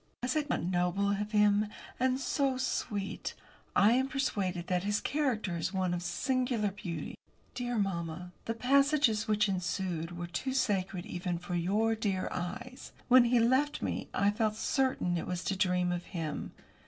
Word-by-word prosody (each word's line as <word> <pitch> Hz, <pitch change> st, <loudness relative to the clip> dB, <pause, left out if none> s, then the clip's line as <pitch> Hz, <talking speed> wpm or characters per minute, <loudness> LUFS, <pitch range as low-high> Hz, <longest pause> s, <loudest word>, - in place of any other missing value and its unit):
Was 250 Hz, +3 st, 0 dB
it 300 Hz, -1 st, 0 dB
not -, -, 0 dB
noble 180 Hz, +3 st, +1 dB
of 205 Hz, +1 st, -2 dB
him? 210 Hz, 0 st, +4 dB, 0.3 s
And 260 Hz, +1 st, +2 dB
so 270 Hz, -1 st, 0 dB
sweet! 205 Hz, -5 st, -2 dB, 0.4 s
I 205 Hz, +2 st, +6 dB
am 260 Hz, +2 st, +3 dB
persuaded 195 Hz, -10 st, -1 dB
that 180 Hz, 0 st, 0 dB
his 205 Hz, +1 st, +1 dB
character 245 Hz, -, 0 dB
is 165 Hz, +4 st, -2 dB
one 185 Hz, -2 st, +1 dB
of 175 Hz, -, -2 dB
singular 230 Hz, +4 st, 0 dB
beauty. 175 Hz, -6 st, -5 dB, 0.4 s
Dear 245 Hz, -1 st, -2 dB
mamma, 180 Hz, -3 st, -2 dB
the 230 Hz, -, -2 dB
passages 275 Hz, -3 st, +3 dB
which 210 Hz, 0 st, +3 dB
ensued 180 Hz, -3 st, -2 dB
were 175 Hz, -, -3 dB
too 215 Hz, +10 st, -3 dB
sacred 190 Hz, -7 st, 0 dB
even 175 Hz, -1 st, -3 dB
for 175 Hz, +1 st, -6 dB
your 205 Hz, +6 st, +2 dB
dear 200 Hz, -4 st, -1 dB
eyes. 245 Hz, +8 st, -6 dB, 0.2 s
When 250 Hz, -1 st, +8 dB
he 240 Hz, 0 st, +4 dB
left 260 Hz, +6 st, +2 dB
me -, -, -2 dB
I 200 Hz, +1 st, +2 dB
felt 215 Hz, 0 st, 0 dB
certain 220 Hz, -9 st, +1 dB
it -, -, -5 dB
was 180 Hz, -1 st, -3 dB
to 195 Hz, -, -1 dB
dream 180 Hz, -2 st, +2 dB
of 175 Hz, 0 st, -3 dB
him. 160 Hz, -5 st, -4 dB
205 Hz, 165 wpm, -31 LUFS, 180-245 Hz, 0.4 s, When